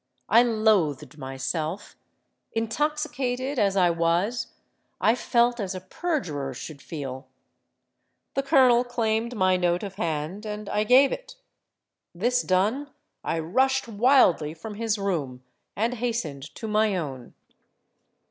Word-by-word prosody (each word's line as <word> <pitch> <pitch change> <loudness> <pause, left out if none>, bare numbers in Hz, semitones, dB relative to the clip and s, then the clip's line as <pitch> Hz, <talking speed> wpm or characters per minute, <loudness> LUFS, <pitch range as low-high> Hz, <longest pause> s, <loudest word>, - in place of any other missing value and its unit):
I 230 +4 +7
loathed 215 - +1
myself: 135 +7 -4 0.6
intoxicated 265 +1 -1
as 200 -2 +2
I 180 -2 +4
was, 175 +8 0 0.5
I 220 - +4
felt 240 0 +2
as 190 -2 -3
a - - -4
perjurer 170 - -3
should 140 +2 -8
feel. 135 -4 -6 1.1
The 275 - +1
colonel 260 -4 +5
claimed 235 -1 -1
my 185 -3 +3
note 175 0 +1
of 195 -1 -7
hand; 165 +2 -3
and 210 -1 -6
I 210 +1 0
gave 260 +4 +6
it. - - -6 0.8
This 245 +7 +1
done, 215 +10 +1 0.3
I - - -1
rushed 260 +12 +1
wildly 205 - +3
from 210 +7 -8
his 220 0 -1
room, 150 -11 -3 0.3
and 230 +4 0
hastened 225 - -4
to 225 - -6
my 215 -1 +2
own. 135 -7 -6
210 Hz, 125 wpm, -26 LUFS, 165-245 Hz, 1.1 s, I